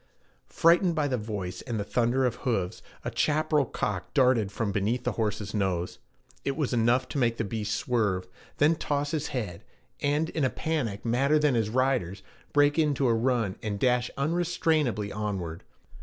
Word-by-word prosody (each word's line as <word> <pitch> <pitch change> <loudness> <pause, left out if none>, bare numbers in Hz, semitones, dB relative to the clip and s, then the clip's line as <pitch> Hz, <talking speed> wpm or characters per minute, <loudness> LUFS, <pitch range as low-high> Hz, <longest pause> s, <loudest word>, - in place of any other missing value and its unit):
Frightened 170 +1 +4
by 150 -3 +1
the 130 - 0
voice 100 -4 -5
and 115 -4 -4
the - - -1
thunder 120 +4 +1
of 125 - -1
hoofs, 95 -8 -2 0.2
a - - -2
chaparral 155 -1 +2
cock 100 -5 -4
darted 125 -7 +3
from 105 0 -2
beneath 110 +5 0
the - - 0
horse's 105 -2 -2
nose. 95 -4 -1 0.4
It 140 0 -2
was 145 -5 -1
enough 120 +2 +2
to 145 - -2
make 115 -2 +1
the - - 0
beast 105 0 -2
swerve, 100 -7 0 0.3
then 155 +3 +4
toss 145 0 -1
his 155 -2 -1
head, 105 -10 -4 0.4
and 150 +3 +1
in 155 - -1
a 130 - +3
panic 125 -13 -2
madder 135 +6 +3
than 150 -2 +3
his 110 -3 +1
rider's, 120 -7 0 0.3
break 145 +1 +4
into 145 -4 +2
a 115 - +4
run 115 -4 0
and 105 -2 -3
dash 125 0 +2
unrestrainably 155 - 0
onward. 95 -6 -3
125 Hz, 170 wpm, -28 LUFS, 105-145 Hz, 0.4 s, Frightened